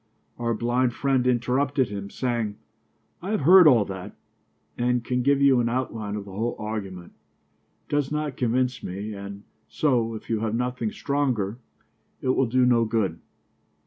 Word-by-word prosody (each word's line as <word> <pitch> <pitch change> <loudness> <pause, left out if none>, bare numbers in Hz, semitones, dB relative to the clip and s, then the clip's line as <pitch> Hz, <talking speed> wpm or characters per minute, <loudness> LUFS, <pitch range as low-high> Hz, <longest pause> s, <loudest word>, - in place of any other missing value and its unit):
Our 115 -1 0
blind 120 +2 +1
friend 135 -2 +1
interrupted 130 +2 +1
him, 100 -1 -6
saying: 115 -3 -2 0.7
"I 185 - -5
have 215 -6 0
heard 180 +4 +8
all 120 -8 +5
that 95 -2 -8 0.6
and 125 0 0
can 125 0 0
give 140 +2 +3
you 135 -3 +5
an 115 -1 +1
outline 115 -4 -3
of 105 -1 -5
the 100 - -10
whole 115 +5 -2
argument. 100 -5 -6 0.7
It - - -19
does 145 -2 0
not 150 -2 -2
convince 125 +1 0
me 100 +4 -5
and 100 0 -8 0.3
so, 120 -6 +1
if 110 - -9
you 115 -2 0
have 110 0 -1
nothing 125 -2 -2
stronger, 125 -7 -1 0.6
it 130 - -2
will 130 0 +2
do 125 +2 +3
no 120 -2 +4
good." 105 -7 -1
120 Hz, 165 wpm, -25 LUFS, 105-130 Hz, 0.7 s, heard